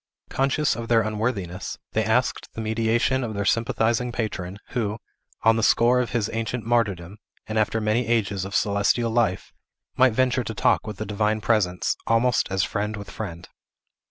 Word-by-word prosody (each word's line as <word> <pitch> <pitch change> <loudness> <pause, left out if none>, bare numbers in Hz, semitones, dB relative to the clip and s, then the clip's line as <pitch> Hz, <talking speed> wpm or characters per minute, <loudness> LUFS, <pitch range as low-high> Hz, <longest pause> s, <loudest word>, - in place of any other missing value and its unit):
Conscious 135 +1 +1
of 115 0 -5
their 115 -1 +4
unworthiness, 105 -4 -3
they 110 - +1
asked 110 +4 0
the - - -6
mediation 115 +4 +1
of 110 -3 -4
their 100 0 -2
sympathizing 115 +2 +1
patron, 100 -5 -4
who, 110 -3 -2 0.5
on 115 0 +5
the - - +1
score 120 +3 +4
of 125 - -1
his 115 -4 0
ancient 115 +1 -3
martyrdom, 105 -6 0 0.3
and 110 0 -1
after 110 +1 +1
many 110 +2 0
ages 100 -5 0
of 95 +1 -5
celestial 105 +3 +2
life, 110 -5 0 0.4
might 130 -2 +5
venture 130 +1 +2
to 110 0 -5
talk 110 - +2
with 105 -3 -6
the 110 - -4
Divine 105 +1 0
Presence, 100 -5 +1
almost 120 +2 +2
as 95 0 +1
friend 105 +1 -2
with 100 - -8
friend. 85 -6 -7
110 Hz, 170 wpm, -24 LUFS, 105-120 Hz, 0.5 s, on